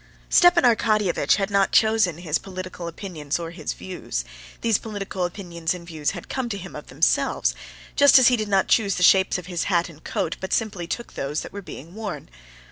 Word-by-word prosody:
Stepan 350 -1 +6
Arkadyevitch 215 -5 +3
had 200 0 -2
not 200 -1 +2
chosen 220 -7 +3
his 165 -3 -1
political 185 -2 -7
opinions 165 -4 -4
or 165 -1 -6
his 165 -3 -5
views; 175 - -5 0.4
these 225 -3 +2
political 200 -4 -4
opinions 175 -2 -4
and 175 -1 -10
views 155 -3 -2
had - - -9
come 260 -3 -3
to 200 - -3
him 190 0 -9
of - - -9
themselves, - - +1 0.4
just 285 -1 +7
as 260 -2 +7
he 250 - +5
did 215 -2 -2
not 195 -2 +2
choose 200 -4 +2
the 180 - -1
shapes 190 +1 +5
of 180 - -8
his 175 -1 -3
hat 175 -2 +1
and 160 -1 -16
coat, 165 - -2
but 190 - -4
simply 195 -6 -1
took 235 +7 -5
those 145 +3 -3
that - - -9
were 200 - -6
being 165 -2 -10
worn. 200 -9 -6
190 Hz, 205 wpm, -23 LUFS, 170-215 Hz, 0.4 s, just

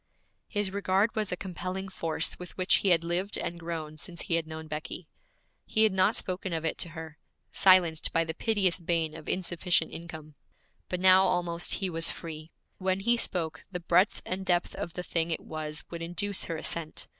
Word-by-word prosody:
His 205 -3 -1
regard 200 +2 +1
was 215 -2 -1
a 180 - -1
compelling 185 +1 -4
force 165 -3 -2
with 180 -1 -9
which 185 0 +4
he - - -1
had 170 -2 +5
lived 175 +4 -1
and 170 - -3
grown 160 -2 -5
since 170 +2 -5
he - - -2
had 165 -1 +1
known 160 0 -6
Becky. 155 +2 -6 0.6
He 220 - +3
had 215 -3 +4
not 185 0 +3
spoken 185 -1 -3
of 165 0 -1
it 160 - -1
to 170 - -1
her, 160 -1 -8 0.3
silenced 180 -4 +5
by 165 - +3
the 160 0 -4
piteous 195 -5 +2
bane 165 -2 0
of 160 -2 -8
insufficient 175 -2 +1
income; 160 -2 -8 0.6
but 180 - -2
now 190 +1 +7
almost 175 -2 +1
he 195 - -1
was 165 -2 +2
free. 155 -1 -6 0.3
When 190 0 0
he 235 +4 +3
spoke, 175 -8 -2
the 180 - -3
breadth 175 +3 +2
and 185 +1 -3
depth 175 -2 +1
of 170 - -5
the 180 - -4
thing 165 -1 0
it 165 - 0
was 155 -1 -5
would 170 -1 -5
induce 180 +4 0
her 165 - -3
assent. 160 0 -2
175 Hz, 195 wpm, -29 LUFS, 165-185 Hz, 0.6 s, now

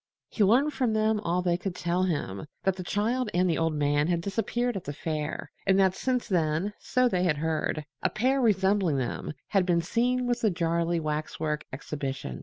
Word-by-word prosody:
He 215 - +1
learned 260 +9 +4
from 245 -4 +1
them 215 0 +2
all 180 -2 0
they 175 -1 +2
could 185 -1 -4
tell 175 +1 0
him 145 - -2 0.2
that 190 -1 +2
the 185 - -6
child 225 +6 0
and 180 +1 +3
the 165 - +1
old 165 -1 +1
man 145 0 +2
had 170 -1 +1
disappeared 230 +5 -1
at 190 - -4
the 145 - -4
fair, 155 0 -4 0.2
and 190 0 +5
that 190 -1 +4
since 250 +4 -1
then 170 +1 0
(so 255 0 +2
they 185 -7 0
had 170 -5 +2
heard) 155 0 -1 0.2
a - - +2
pair 260 +5 +1
resembling 195 - +2
them 125 -2 -3 0.2
had 195 -3 +3
been 175 -2 +1
seen 245 +6 +1
with 245 0 0
the 220 - +3
Jarley 170 -1 0
waxwork 155 0 -2
exhibition. 135 - -5
180 Hz, 200 wpm, -28 LUFS, 155-215 Hz, 0.2 s, and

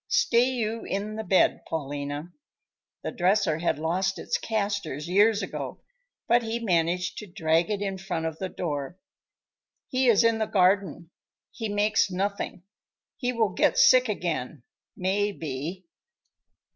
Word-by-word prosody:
Stay 260 - +3
you 230 -3 -2
in 205 +2 -3
the 220 - -4
bed, 190 -2 +3
Paulina." 145 +2 -4 0.7
The - - -3
dresser 185 -3 +2
had 170 - 0
lost 180 +5 -1
its - - -2
casters 200 -9 -2
years 205 +4 +4
ago, - - -6 0.4
but 240 +1 +4
he 225 0 -2
managed 175 -4 0
to 210 - -9
drag 170 -1 +1
it 205 -1 -1
in 195 -1 -3
front 180 -4 -3
of 160 -1 -4
the 190 - -3
door. 145 -2 -4 0.9
"He 255 0 +1
is 230 -3 +5
in 230 -1 +3
the 220 - 0
garden. 185 -3 +1 0.4
He 225 -3 -5
makes 205 0 +2
nothing. 195 -1 -3 0.5
He 250 -3 -1
will 230 -4 +1
get 180 - +2
sick 255 -2 +6
again, 155 - -3 0.3
may 200 +3 0
be." 165 +2 -5
195 Hz, 145 wpm, -26 LUFS, 165-215 Hz, 0.9 s, sick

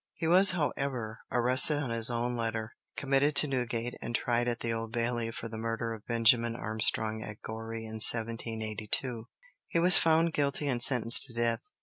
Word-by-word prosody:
He 165 - -5
was, 185 +3 +5
however, 135 -8 -3
arrested 130 +5 +1
on 145 -5 -4
his 115 0 +3
own 120 +1 -2
letter, 115 -1 -4 0.2
committed 140 +1 0
to 150 - +7
Newgate, 120 -3 -3
and 120 - -5
tried 120 0 -1
at 120 0 -3
the 115 -1 -2
Old 115 0 -5
Bailey 120 -1 -2
for 115 0 -7
the 110 -1 -8
murder 115 0 -4
of 110 -2 -12
Benjamin 115 0 +2
Armstrong 110 0 0
at 105 -1 -9
Goree 115 0 -7
in 110 0 -8
1782. 115 +1 0 0.4
He - - -3
was 180 +2 +6
found 165 0 +2
guilty 145 0 -1
and 125 -3 -2
sentenced 120 +1 +6
to 120 -4 -8
death. 115 -1 -1
115 Hz, 180 wpm, -29 LUFS, 115-130 Hz, 0.4 s, to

